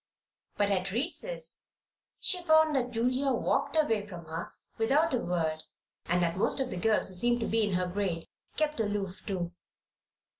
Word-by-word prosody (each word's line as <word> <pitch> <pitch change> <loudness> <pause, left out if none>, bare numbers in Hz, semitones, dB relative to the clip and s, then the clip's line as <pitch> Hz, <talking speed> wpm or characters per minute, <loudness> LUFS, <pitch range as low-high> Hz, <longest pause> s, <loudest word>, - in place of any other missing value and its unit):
But 205 -1 +2
at 190 -1 0
recess 340 - 0 0.5
she 365 -1 +2
found 315 -2 +5
that 250 -2 +1
Julia 255 +3 +1
walked 245 - 0
away 225 -10 +2
from 175 -4 -9
her 160 +2 -5 0.3
without 280 +8 +3
a 250 - +2
word 165 -6 -1 0.5
and 175 +1 +2
that 170 +1 0
most 200 - +1
of 260 -2 -1
the - - -3
girls 215 +4 +2
who - - -10
seemed 240 +6 +2
to - - 0
be 225 +1 +2
in 205 -3 0
her 180 0 +1
grade 180 -3 -2 0.3
kept 305 -3 0
aloof, 205 -3 -2
too. 180 -4 -2
215 Hz, 175 wpm, -30 LUFS, 180-265 Hz, 0.5 s, found